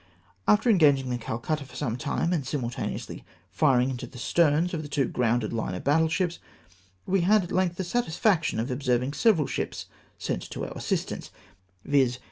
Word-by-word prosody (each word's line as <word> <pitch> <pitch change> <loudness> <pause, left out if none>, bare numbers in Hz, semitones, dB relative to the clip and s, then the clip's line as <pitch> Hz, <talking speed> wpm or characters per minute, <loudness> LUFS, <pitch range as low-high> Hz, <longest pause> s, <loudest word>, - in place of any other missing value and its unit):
After 210 +3 +4
engaging 145 - +4
the 120 - -2
Calcutta 130 +7 -3
for 135 - -15
some 120 -6 -2
time, 155 +5 -1
and 160 -5 0
simultaneously 125 -3 -4 0.3
firing 135 -4 +3
into 125 - -5
the 130 - -13
sterns 165 +5 +2
of 160 - -2
the 150 - -7
two 145 -2 +1
gromided 120 -2 0
line 110 -5 -2
of - - -6
battle 160 +3 +3
ships, 175 +1 -1 0.7
we 190 0 +2
had 205 +3 +4
at 175 - -8
length 185 -2 +1
the 190 - -3
satisfaction 175 - +1
of 120 +4 -2
observing 125 0 0
several 185 -6 +3
ships - - -4 0.3
sent - - -3
to - - -4
our - - -8
assist - - -2
ance, - - -6 0.6
viz. 130 -4 +2
145 Hz, 180 wpm, -27 LUFS, 125-175 Hz, 0.7 s, After